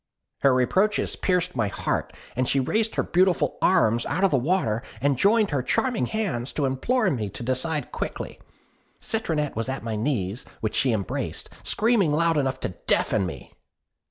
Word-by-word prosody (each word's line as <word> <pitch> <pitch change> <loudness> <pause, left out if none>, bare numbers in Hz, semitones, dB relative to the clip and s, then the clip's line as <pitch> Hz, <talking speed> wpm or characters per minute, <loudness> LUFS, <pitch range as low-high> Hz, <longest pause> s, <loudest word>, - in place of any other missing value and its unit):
"Her 140 - +4
reproaches 185 - +2
pierced 180 -1 0
my 110 -4 +1
heart; 100 - -2 0.3
she 135 +2 +1
raised 220 - 0
her - - +1
beautiful 185 0 +2
arms 115 - +3
out 170 +7 -1
of 195 - +4
the - - +3
water, 125 - +1 0.2
and 140 +3 +2
joined 210 - +3
her 140 -3 +1
charming 245 - 0
hands 175 - -2
to 145 - 0
implore 190 - +1
me 110 -7 -2
to 120 - -8
decide 130 +4 -1
quickly. - - -5 0.6
Citronette 160 -10 -1
was 115 +3 -2
at 135 -2 -4
my 115 -1 -3
knees, 110 -2 -2 0.2
which 110 - -2
she 130 - +2
embraced, 105 -4 -3
screaming 215 -7 +2
loud 165 0 +2
enough 130 -1 -1
to - - -1 0.2
deafen 100 -4 +2
me. 70 -7 -9
140 Hz, 165 wpm, -25 LUFS, 120-185 Hz, 0.6 s, Her